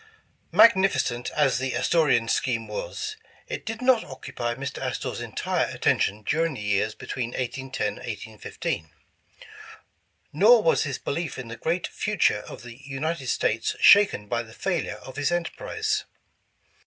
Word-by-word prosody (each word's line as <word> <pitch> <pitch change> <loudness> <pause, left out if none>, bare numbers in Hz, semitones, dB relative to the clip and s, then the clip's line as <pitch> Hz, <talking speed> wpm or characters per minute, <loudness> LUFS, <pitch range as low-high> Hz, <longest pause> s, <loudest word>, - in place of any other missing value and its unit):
MAGNIFICENT 190 - +4
as 140 -5 +3
the 130 -1 -2
Astorian 125 -3 +3
scheme 115 -1 0
was, 430 -4 -5 0.3
it - - -6
did 225 +2 -4
not 250 -3 +4
occupy 120 -2 -5
Mr. 140 +1 -5
Astor's - - -3
entire - - -1
attention 105 +2 0
during 160 +5 0
the - - -7
years 105 +1 0
between 120 +2 -4
1810 130 +1 -2
1815. 105 -7 -5 1.4
Nor 215 +8 +6
was 160 - +3
his 135 -3 -3
belief 160 +1 -3
in 125 -2 -7
the 115 - -6
great 165 +9 -1
future 210 - +1
of - - -9
the 120 +2 -11
United 140 +1 -3
States 115 -2 0
shaken 200 - +6
by 115 +2 -1
the 110 -1 -12
failure 180 -4 -2
of 130 0 -10
his 145 +3 +1
enterprise. 435 - -2
135 Hz, 140 wpm, -25 LUFS, 120-175 Hz, 1.4 s, Nor